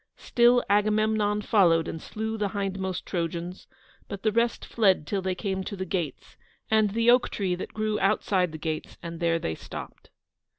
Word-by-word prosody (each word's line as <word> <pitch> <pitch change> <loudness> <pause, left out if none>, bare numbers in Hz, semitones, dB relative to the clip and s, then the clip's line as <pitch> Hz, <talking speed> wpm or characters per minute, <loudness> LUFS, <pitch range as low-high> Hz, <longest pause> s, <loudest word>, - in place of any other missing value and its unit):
Still 240 +1 +4
Agamemnon 210 0 +2
followed 170 -7 +4
and 160 - -5
slew 220 +1 -4
the 210 -2 -1
hindmost 190 -2 -3
Trojans, 170 +1 -4 0.4
but 200 -1 -7
the 215 - +3
rest 230 +2 0
fled 195 -8 +2
till 195 +3 -2
they 185 0 -1
came 190 0 -2
to 200 - -5
the 190 -1 -4
gates, 170 -8 -4 0.3
and 215 -1 +4
the 230 +1 +5
oak 245 0 +4
tree 190 -3 -1
that 180 - -6
grew 215 -1 -1
outside 190 -3 +1
the 155 - -6
gates, 155 0 -4
and 170 -1 -6
there 170 -1 +2
they 115 - -3
stopped. - - -9
195 Hz, 175 wpm, -27 LUFS, 175-215 Hz, 0.4 s, the